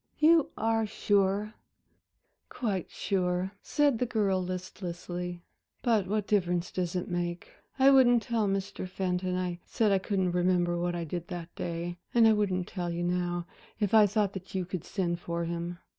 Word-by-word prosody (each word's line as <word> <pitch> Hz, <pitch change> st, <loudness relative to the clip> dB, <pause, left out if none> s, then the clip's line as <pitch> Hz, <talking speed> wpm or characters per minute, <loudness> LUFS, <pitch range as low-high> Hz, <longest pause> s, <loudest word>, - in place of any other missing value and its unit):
You 320 Hz, 0 st, +5 dB
are 225 Hz, -1 st, +1 dB
sure?" 205 Hz, +1 st, +1 dB, 1.0 s
"Quite 205 Hz, -8 st, -2 dB
sure," 180 Hz, -1 st, -1 dB
said 290 Hz, -6 st, +2 dB
the 250 Hz, -, +1 dB
girl 200 Hz, -5 st, +1 dB
listlessly, 180 Hz, -1 st, -5 dB, 0.4 s
"but 220 Hz, -6 st, +2 dB
what 210 Hz, +1 st, 0 dB
difference 180 Hz, -4 st, +1 dB
does 180 Hz, -1 st, -2 dB
it 180 Hz, -, -2 dB
make? 175 Hz, 0 st, -3 dB, 0.3 s
I 270 Hz, 0 st, +6 dB
wouldn't 245 Hz, -4 st, +6 dB
tell 230 Hz, -4 st, 0 dB
Mr. 195 Hz, -1 st, -2 dB
Fenton 185 Hz, -1 st, -1 dB
I 180 Hz, -1 st, -2 dB
said 215 Hz, -3 st, +1 dB
I 195 Hz, -, +4 dB
couldn't 190 Hz, -2 st, 0 dB
remember 175 Hz, -1 st, +2 dB
what 175 Hz, 0 st, -1 dB
I 170 Hz, -, -2 dB
did 170 Hz, +1 st, -5 dB
that 175 Hz, -1 st, -7 dB
day, 175 Hz, +1 st, -4 dB, 0.2 s
and 230 Hz, -1 st, +7 dB
I 220 Hz, -, +6 dB
wouldn't 190 Hz, -4 st, 0 dB
tell 175 Hz, -3 st, -3 dB
you 170 Hz, +1 st, -2 dB
now, 175 Hz, -1 st, -1 dB, 0.3 s
if 205 Hz, -2 st, 0 dB
I 215 Hz, -2 st, +7 dB
thought 205 Hz, -1 st, 0 dB
that 190 Hz, 0 st, -8 dB
you 185 Hz, -1 st, 0 dB
could 180 Hz, -2 st, -5 dB
send 175 Hz, -3 st, -1 dB
for 170 Hz, -1 st, -3 dB
him. 170 Hz, +1 st, -4 dB
185 Hz, 170 wpm, -29 LUFS, 175-210 Hz, 1.0 s, and